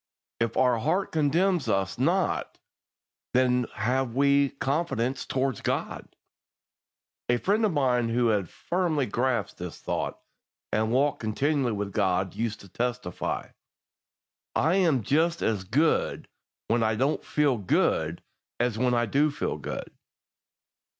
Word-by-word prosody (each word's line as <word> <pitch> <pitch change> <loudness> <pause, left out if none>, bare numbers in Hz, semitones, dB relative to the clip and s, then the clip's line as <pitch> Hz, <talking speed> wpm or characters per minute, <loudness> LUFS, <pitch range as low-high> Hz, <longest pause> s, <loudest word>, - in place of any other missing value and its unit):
"If 115 -1 -1
our 125 -3 +3
heart 190 - 0
condemns 165 +3 +1
us 95 -1 0
not, - - 0 0.8
then 125 -1 +3
have 125 +3 0
we 140 0 +4
confidence 135 -3 -1
toward 135 0 -1
God." - - -3 1.1
A 120 - +4
friend 205 - +1
of 215 - +3
mine 125 -6 +1
who 120 0 +2
had 100 -5 0
firmly 170 -6 -1
grasped 125 +3 -1
this - - -6
thought, - - -3 0.6
and 110 +1 +1
walked 140 +4 +2
continually 130 +3 0
with 100 -1 -3
God, 95 -2 +1
used 110 -2 -3
to 100 - -13
testify: 120 -1 -3 1.1
"I 160 +4 +3
am 160 - +3
just 165 - +1
as 105 -4 0
good 145 - +1 0.4
when 115 +1 +2
I 110 -1 +2
don't 135 +7 0
feel 145 -6 +1
good 85 -4 +1 0.4
as 120 -2 0
when 125 0 +2
I 120 0 +2
do 140 +7 +2
feel 145 - -3
good." - - -6
125 Hz, 130 wpm, -27 LUFS, 110-145 Hz, 1.1 s, we